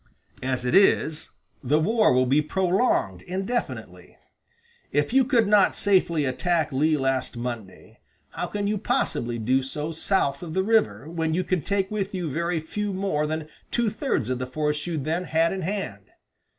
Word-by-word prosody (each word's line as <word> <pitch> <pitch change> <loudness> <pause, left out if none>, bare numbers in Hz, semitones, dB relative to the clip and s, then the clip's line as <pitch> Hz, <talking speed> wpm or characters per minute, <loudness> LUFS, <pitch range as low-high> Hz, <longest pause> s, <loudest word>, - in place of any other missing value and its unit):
As 130 -1 -2
it 125 - 0
is, 160 -5 +3 0.3
the 145 +4 +2
war 215 +7 +3
will 130 0 +3
be 140 +4 +3
prolonged 180 - +1
indefinitely. 195 - -4 0.7
If 145 +8 0
you 265 0 +6
could 240 -4 +2
not 205 -1 +4
safely 175 -6 +2
attack 160 +3 0
Lee 150 +3 +2
last 135 -2 -1
Monday, 120 -6 -7 0.3
how 175 - -3
can 205 +3 -3
you 210 0 0
possibly 155 - -1
do 125 +4 +2
so 150 +4 -4
south 160 -4 0
of 165 -3 -6
the 190 - +2
river, 220 -8 +1
when 160 -1 -1
you 185 - +1
can 185 -3 0
take 195 +4 -1
with 200 -2 -2
you 175 -5 -3
very 170 +2 0
few 205 +6 -3
more 185 -6 0
than 155 0 -3 0.2
two 235 -3 +1
thirds 210 - -1
of 125 - -1
the 130 - -3
force 150 +3 -2
you 170 -2 -2
then 160 +5 -2
had 165 +2 +2
in 190 - -4
hand? 170 - -4
160 Hz, 175 wpm, -25 LUFS, 140-195 Hz, 0.7 s, you